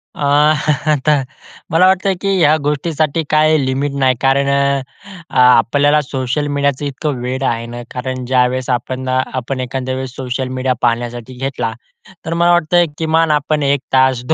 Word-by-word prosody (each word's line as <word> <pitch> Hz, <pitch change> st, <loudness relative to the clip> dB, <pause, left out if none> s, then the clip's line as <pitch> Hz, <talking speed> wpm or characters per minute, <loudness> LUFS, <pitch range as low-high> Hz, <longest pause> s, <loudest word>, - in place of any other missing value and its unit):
अ, -, -, -14 dB, 0.7 s
आता 150 Hz, +1 st, +2 dB, 0.6 s
मला 165 Hz, +3 st, +4 dB
वाटतं 190 Hz, +1 st, +2 dB
की 195 Hz, -, -1 dB
ह्या 155 Hz, -1 st, +5 dB
गोष्टीसाठी 155 Hz, +1 st, -1 dB
काही 155 Hz, -2 st, +3 dB
लिमिट 135 Hz, +2 st, -1 dB
नाही. 130 Hz, -1 st, +3 dB
कारण 135 Hz, +1 st, +2 dB, 0.9 s
आपल्याला 130 Hz, +4 st, +4 dB
सोशल 135 Hz, 0 st, -3 dB
मीडियाचं 140 Hz, 0 st, -1 dB
इतकं 140 Hz, -2 st, -3 dB
वेड 130 Hz, +2 st, -3 dB
आहे 115 Hz, -2 st, -1 dB
ना, 120 Hz, +1 st, -7 dB
कारण 130 Hz, 0 st, -4 dB
ज्यावेळेस 130 Hz, 0 st, +1 dB
आपण 130 Hz, +1 st, -2 dB
अ, 130 Hz, -, +1 dB, 0.2 s
आपण 130 Hz, +1 st, -3 dB
एखाद्या 130 Hz, 0 st, -3 dB
वेळेस 130 Hz, -1 st, -6 dB
सोशल 130 Hz, 0 st, -3 dB
मीडिया 130 Hz, 0 st, 0 dB
पाहण्यासाठी 120 Hz, +1 st, -2 dB
घेतला, 125 Hz, -4 st, -3 dB, 0.5 s
तर 165 Hz, -, -2 dB
मला 170 Hz, +1 st, +3 dB
वाटतय 175 Hz, 0 st, +3 dB
किमान 160 Hz, 0 st, +1 dB
आपण 150 Hz, 0 st, 0 dB
1 140 Hz, 0 st, +2 dB
तास, 130 Hz, -2 st, +3 dB
135 Hz, 150 wpm, -16 LUFS, 130-150 Hz, 0.9 s, ह्या